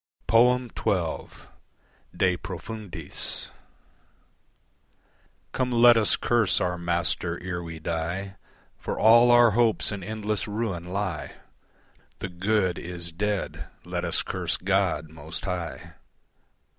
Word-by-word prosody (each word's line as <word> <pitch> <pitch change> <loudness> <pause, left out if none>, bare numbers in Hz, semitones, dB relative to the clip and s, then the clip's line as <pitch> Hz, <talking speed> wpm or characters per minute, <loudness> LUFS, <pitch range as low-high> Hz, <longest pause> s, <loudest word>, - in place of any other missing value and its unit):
XII. 125 +2 +5 1.5
De 90 -1 +3
Profundis 95 -2 -6 2.0
Come 130 -1 -1
let 120 0 +7
us 110 -2 +3
curse 120 -5 +2
our 90 -1 0
Master 85 0 -1
ere 90 -1 -3
we 85 -1 -7
die, 85 +5 -3 0.4
For - - -4
all 120 +2 +7
our 120 -1 +7
hopes 115 0 +2
in 100 -1 -5
endless 105 0 -2
ruin 105 -5 -3
lie. 90 -3 -3 0.8
The 95 - -5
good 95 +1 0
is 85 -1 -4
dead. 105 +3 -2 0.2
Let - - -3
us - - 0
curse - - -1
God 90 -5 0
most 80 +1 -6
High. 90 -4 -5
95 Hz, 105 wpm, -26 LUFS, 85-110 Hz, 2.0 s, let